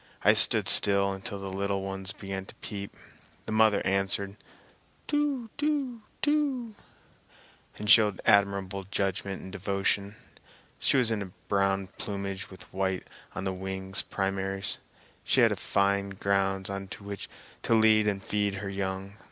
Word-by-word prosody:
I - - +7
stood - - +5
still 100 -1 +3
until 95 +2 -5
the 95 -1 -6
little 100 0 -1
ones 95 0 -4
began 95 -1 -6
to - - -12
peep; 100 -2 -7 0.5
the - - -5
mother 110 -1 +4
answered 100 +1 0 0.7
"Too 285 -6 -1
too 285 -6 -1 0.2
too" 280 -6 +1 1.0
and 105 - -5
showed 105 -3 +6
admirable 100 -1 +2
judgment 95 -1 -2
and 95 - -8
devotion. 100 +1 0 0.6
She - - +2
was 120 -3 +3
in 100 -4 -2 0.2
brown 100 -1 +1
plumage 100 -1 -4
with 95 - -11
white 95 -1 -1 0.3
on 95 - -3
the 95 -1 -1
wing 95 0 -5 0.2
primaries. 95 0 +1 0.4
She - - +3
had - - +4
fine 100 0 +1
grounds 95 0 0
on 100 0 -4
which 100 -1 -7 0.3
to 115 - +2
lead 110 -1 +5
and 100 -2 -1
feed 105 -1 0
her 100 +1 -4
young. 95 +1 -4
100 Hz, 140 wpm, -29 LUFS, 95-105 Hz, 1.0 s, I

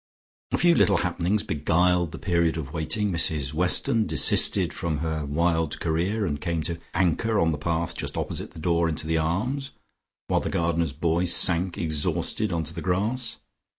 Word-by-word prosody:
A - - +1
few 175 -1 +4
little 100 -10 +3
happenings 90 +4 0
beguiled 85 +2 +1
the - - -7
period 85 -3 0
of 75 -5 -6
waiting. 95 +6 -1
Mrs 75 -5 -1
Weston 90 +6 +2
desisted 75 -5 +4
from 80 -3 -2
her 80 -1 -3
wild 80 +1 0
career, 90 +7 -1
and 75 -5 -3
came 85 -2 -2
to 85 +1 -4 0.2
anchor 95 +5 +1
on 80 0 +2
the 75 - -3
path 85 +2 -2
just - - -6
opposite - - -3
the - - -12
door 85 +1 +1
into 80 0 -3
the 80 0 0
Arms, 125 - -2 0.6
while - - +2
the - - -4
gardener's 85 -2 0
boy 85 +3 0
sank 85 +1 +1
exhausted 85 +5 0
on 85 -1 -1
to 80 +2 -7
the 85 - -6
grass. 110 +7 -1
85 Hz, 175 wpm, -25 LUFS, 80-90 Hz, 0.6 s, few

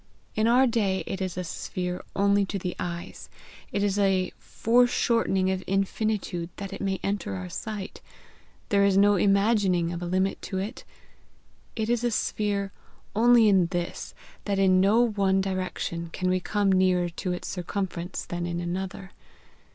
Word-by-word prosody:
In 215 +1 +1
our 250 +3 +5
day 210 -6 +1
it 195 0 -4
is 185 -2 -3
a 180 - -2
sphere 180 +1 -4
only 200 0 +3
to 200 - -3
the 180 -1 -4
eyes; 170 -1 -6 0.4
it 200 - 0
is 205 0 +1
a 190 -2 +2
foreshortening 230 -5 +2
of 190 0 -2
infinitude 195 -2 -1
that 195 -1 -6
it - - -6
may 195 -1 -1
enter 195 - -2
our 90 -1 -6
sight; 205 - -6 0.7
there 200 -1 +4
is 200 -1 +3
no 205 +1 +6
imagining 195 -3 +2
of 170 - -5
a 175 - -3
limit 190 +2 0
to 190 - -4
it; 195 +4 -4 0.9
it 220 -1 -1
is 240 0 +1
a 240 - +2
sphere 205 -3 -1 0.4
only 235 0 +6
in 190 -4 +4
this, 175 -1 -4 0.3
that 200 -2 0
in 185 -1 +4
no 210 +5 +4
one 195 -2 +2
direction 185 -3 -3
can 185 +1 -1
we 185 - +2
come 205 +1 +1
nearer 185 -1 +3
to 180 +2 -4
its 180 - -4
circumference 180 -1 -4
than 175 0 -4
in 170 0 -3
another. 190 +2 -4
195 Hz, 165 wpm, -26 LUFS, 180-205 Hz, 0.9 s, no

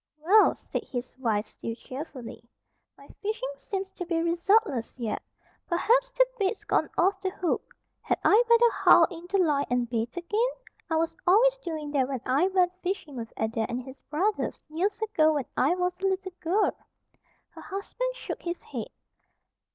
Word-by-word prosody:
"Well," 375 +8 +5
said - - -5
his 245 -1 -5
wife, 220 -4 0
still 230 - -6
cheerfully, 255 -3 -8 0.5
"my - - -16
fishing 440 +4 -2
seems 390 -1 -4
to 360 - -6
be 335 -1 -1
resultless 340 - +1
yet. 230 -4 -3 0.5
Perhaps 475 +8 +3
the - - +5
bait's 395 +1 0
gone - - +1
off 385 +2 +2
the 380 - 0
hook. 370 -2 -3 0.3
Had - - 0
I 445 +4 +6
better 470 0 +6
haul - - +6
in 345 0 -9
the 395 - +2
line 300 -6 +2
and 245 -1 +1
bait 230 +4 -3
again? 420 +8 +1 0.4
I 320 - +1
was 325 +1 0
always 475 +7 +6
doing 315 -8 -5
that 270 -3 +2
when 265 -3 -3
I 280 +8 +3
went 365 -2 +2
fishing 355 -6 -3
with 230 -2 -6
Adair 220 0 -1
and 245 +1 -3
his 265 +1 -11
brothers, 380 +8 -1
years 385 +7 -1
ago, 315 -8 +3
when 285 -4 -1
I 290 +7 +3
was 360 0 -1
a 390 - +1
little 380 -1 -2
girl." 370 +5 +2 0.8
Her - - -12
husband - - -4
shook - - -6
his 345 0 -4
head. - - -6
345 Hz, 175 wpm, -27 LUFS, 270-395 Hz, 0.8 s, I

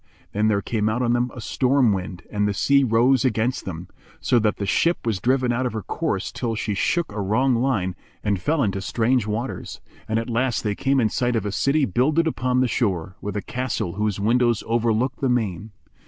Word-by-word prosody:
Then 105 +1 +1
there 100 -2 +1
came 110 -2 0
out 120 +3 -1
on 120 -1 +2
them 120 +1 +1
a - - -7
storm 125 0 +2
wind 90 -1 -5
and 105 -1 +1
the 100 - -1
sea 140 +7 +3
rose 120 +1 +3
against 125 0 0
them, 85 -1 -6 0.3
so 120 - +2
that 105 -1 +1
the 100 - -3
ship 165 - +1
was 110 -5 0
driven 130 +1 +1
out 125 +2 0
of 120 - -5
her 110 -2 -4
course - - -2
till 115 -2 -3
she 105 -1 -2
took 165 - 0
a 105 0 -4
wrong 125 +7 +2
line 115 -7 0 0.3
and 100 -3 0
fell 150 - +1
into 100 -2 -1
strange 115 +3 +1
waters; 115 +5 -4 0.3
and, 110 - +1
at 115 - -2
last 120 0 0
they 105 - 0
came 135 +6 +1
in 110 -3 +2
sight 120 +1 0
of 110 -3 -1
a 105 - -2
city 140 +7 +2
builded 145 - +2
upon 125 -5 0
the 130 - +3
shore, 95 -7 -1
with 105 +1 -4
a 100 - -3
castle 125 -8 -3
whose 105 -1 -1
windows 120 +2 +2
overlooked 115 +2 0
the 135 - +1
main. 110 -4 -1
115 Hz, 215 wpm, -23 LUFS, 105-125 Hz, 0.3 s, sea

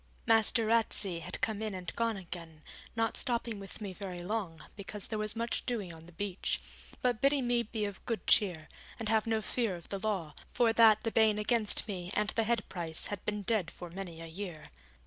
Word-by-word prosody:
Master 225 0 +4
Ratsey 215 -5 +1
had 165 - -6
come 220 -2 0
in 215 -3 -2
and 180 -2 -6
gone 230 -2 +1
again, 165 -4 -9 0.3
not 225 -1 +1
stopping 235 -4 -1
with 195 +2 -9
me 200 -3 -4
very 185 -2 -6
long, 175 -4 -3
because 200 0 -3
there 215 -1 -3
was 215 +1 0
much 230 +1 -1
doing 210 -8 -2
on 165 0 -12
the - - -12
beach; 195 +2 -2 0.4
but 245 -3 +2
bidding 275 -1 +4
me 240 0 +3
be 220 -1 -2
of 200 -2 -6
good 230 -3 -1
cheer, 175 -8 +4 0.3
and 220 -2 -1
have 220 0 +3
no 220 -1 +1
fear 230 -6 0
of 170 - -10
the 200 - -2
law; 190 -8 -1 0.2
for 230 -2 +4
that 220 -2 +7
the 225 - 0
ban 220 -2 +4
against 215 +1 +3
me 180 -4 -4
and 210 0 +2
the 225 0 +2
head 230 -2 +1
price 165 -3 -2
had 205 - -5
been 210 -1 -2
dead 200 -5 +1
for 175 0 -9
many 175 -3 -6
a - - -6
year. 165 -1 -7
210 Hz, 210 wpm, -32 LUFS, 180-225 Hz, 0.4 s, that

